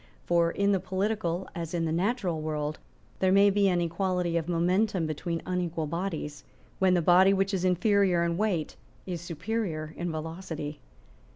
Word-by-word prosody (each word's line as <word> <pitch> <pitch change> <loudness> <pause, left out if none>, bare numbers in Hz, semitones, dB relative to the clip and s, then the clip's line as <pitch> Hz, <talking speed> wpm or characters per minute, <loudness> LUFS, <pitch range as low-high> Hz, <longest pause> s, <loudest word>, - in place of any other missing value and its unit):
For 170 -1 +3
in 200 +3 +1
the 195 - +2
political, 190 -1 -2
as 170 -1 -4
in 165 -1 0
the 160 - -1
natural 180 -2 0
world, 155 -1 -3 0.4
there 185 -1 +3
may 200 +1 +6
be 200 0 +3
an 175 -1 +1
equality 175 0 -1
of 170 0 -1
momentum 180 +2 +1
between 165 +2 -3
unequal 175 -3 -2
bodies, 160 -2 -4 0.4
when 185 -1 +4
the 175 - +1
body 185 +3 +6
which 195 +1 +1
is 185 -2 0
inferior 185 -1 +3
in 170 0 0
weight 185 -5 -1 0.3
is 175 -3 -4
superior 170 -2 -3
in 175 0 -3
velocity. 160 -1 -5
175 Hz, 165 wpm, -28 LUFS, 165-190 Hz, 0.4 s, may